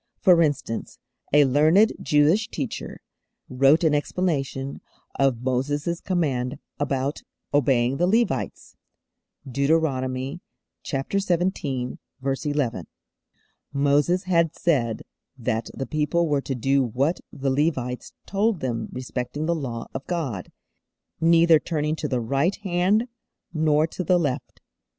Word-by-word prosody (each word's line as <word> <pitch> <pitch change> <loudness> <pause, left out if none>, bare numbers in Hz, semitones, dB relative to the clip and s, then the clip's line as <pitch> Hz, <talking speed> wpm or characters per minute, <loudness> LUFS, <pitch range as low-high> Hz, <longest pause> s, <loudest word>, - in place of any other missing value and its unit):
For 180 -5 +5
instance, 145 -7 -1 0.3
a 145 0 +6
learned 155 - +4
Jewish 155 +9 +3
teacher 140 - -5 0.5
wrote 135 +6 +4
an 160 -2 +3
explanation 145 -4 -1 0.4
of 130 -3 +2
Moses' 145 +6 -1
command 140 -8 -1 0.2
about 140 0 -1 0.3
obeying 135 -2 +2
the 175 - +2
Levites. 230 +5 0 0.7
(Deuteronomy 135 0 0 0.4
xvii. 160 -4 -1 0.2
11.) 135 - -1 0.8
Moses 145 +6 +2
had 170 -4 +2
said 120 -10 0 0.3
that 115 -2 -2
the 135 - -3
people 155 +3 0
were 145 -2 +1
to 135 - -3
do 135 +3 +2
what 135 +8 0
the 135 -1 -2
Levites 130 -4 -1
told 205 0 +1
them 115 -4 -3
respecting 130 +3 -4
the 170 - +1
Law 125 -8 -4
of 135 - -6
God, 140 - -3 0.7
neither 165 0 +5
turning 155 -2 -1
_'to 150 -2 -4
the 125 - 0
right 140 - +1
hand, 190 +5 +2 0.5
nor 155 -1 +3
to 175 +3 -5
the 180 +2 +3
left. 145 -6 -3
145 Hz, 115 wpm, -24 LUFS, 130-170 Hz, 0.8 s, a